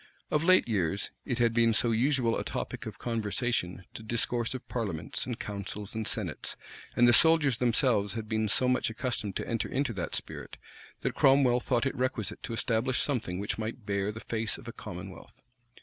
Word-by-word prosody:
Of 150 - +2
late 185 -3 +5
years, 100 -3 0
it 125 -4 -1
had 120 -1 +3
been 115 -1 +4
so 115 +2 +3
usual 120 0 +2
a - - -2
topic - - -4
of - - -7
conversation 115 -5 -1
to - - -7
discourse 120 +2 0
of 130 - -8
parliaments, 100 -8 -3
and 120 -2 -4
councils, 100 0 -5
and 110 -1 -2
senates, - - -1 0.4
and 120 - +6
the 120 - +6
soldiers 150 -2 +5
themselves 115 -4 +2
had 110 -1 -5
been 110 0 0
so 125 +4 +2
much 125 -1 +2
accustomed 115 -3 -3
to - - -3
enter 115 -1 -1
into 130 -2 0
that 90 -4 -3
spirit, - - -6 0.4
that - - -1
Cromwell 135 -3 +5
thought 125 0 0
it 135 - 0
requisite 125 -6 -2
to - - -5
establish 115 +2 0
something 115 -11 -1
which 100 +3 -3
might 110 +1 -5
bear 100 0 0
the 110 +1 -8
face 110 -1 -2
of - - -13
a - - -6
commonwealth. - - -9
115 Hz, 190 wpm, -30 LUFS, 105-125 Hz, 0.4 s, and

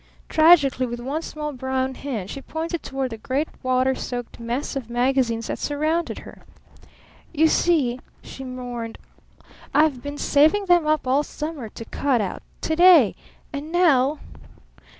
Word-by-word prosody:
Tragically, 310 -6 +5
with 240 0 -5
one 275 +6 -3
small 300 -2 -5
brown 260 0 -2
hand, 235 -9 -5
she 275 - -6
pointed 325 +3 -4
toward 270 -2 -3
the 225 - -7
great 270 +7 -1
water 255 0 +2
soaked 245 -2 -6
mess 235 +5 -3
of 255 -4 -5
magazines 240 -2 +1
that - - -4
surrounded 310 +3 -1
her. - - -13 0.9
"You 320 0 +4
see," 290 -8 +2 0.2
she 265 - -9
mourned, 245 -3 -6 0.8
"I've 295 -4 +3
been 285 +1 -6
saving 310 +9 +3
them 350 -4 +4
up 310 -2 +1
all 265 +3 +3
summer 300 -5 -6
to 230 - -9
cut 265 +1 0
out 195 -4 -3 0.2
to 315 - -1
day! 340 - +7 0.4
And 290 +3 -5
now? 305 -5 +3
270 Hz, 150 wpm, -23 LUFS, 250-310 Hz, 0.9 s, day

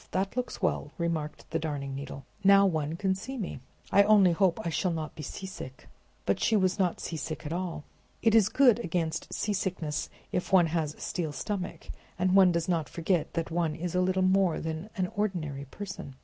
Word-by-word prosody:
that 195 +3 -1
looks 250 -5 -3
well," 165 -5 0
remarked 165 -3 -3
the 165 - 0
Darning 145 -4 -3
Needle. 135 0 -7 0.2
"Now 200 0 +7
one 160 -4 0
can 190 +2 +1
see 260 +8 -6
me. 205 -7 -4 0.3
I 200 - +7
only 200 -3 +6
hope 185 +2 +2
I - - +1
shall 180 +3 0
not 160 -2 -3
be - - -8
seasick!" 150 -3 -8 0.4
But 100 - +1
she 225 - +2
was 185 -1 +2
not 180 -3 +1
seasick 155 -1 -5
at 150 - -3
all. 175 -3 -3 0.4
"It 225 - +4
is 220 -2 +6
good 250 -4 +5
against 165 -6 -2
seasickness, 185 -7 -2 0.2
if 180 - -2
one 185 -3 +6
has 155 -3 -1
a - - -20
steel 165 -4 -2
stomach, 180 +7 -4 0.3
and 185 0 +5
does 170 -1 -1
not 165 -5 0
forget 170 -1 0
that 165 -1 -2
one 165 -2 0
is 170 +1 -4
a 180 - +2
little 185 +1 +2
more 185 -2 +3
than 160 +5 -4
an 185 - +2
ordinary 165 -10 -2
person! 180 -2 -8
175 Hz, 190 wpm, -29 LUFS, 160-195 Hz, 0.4 s, Now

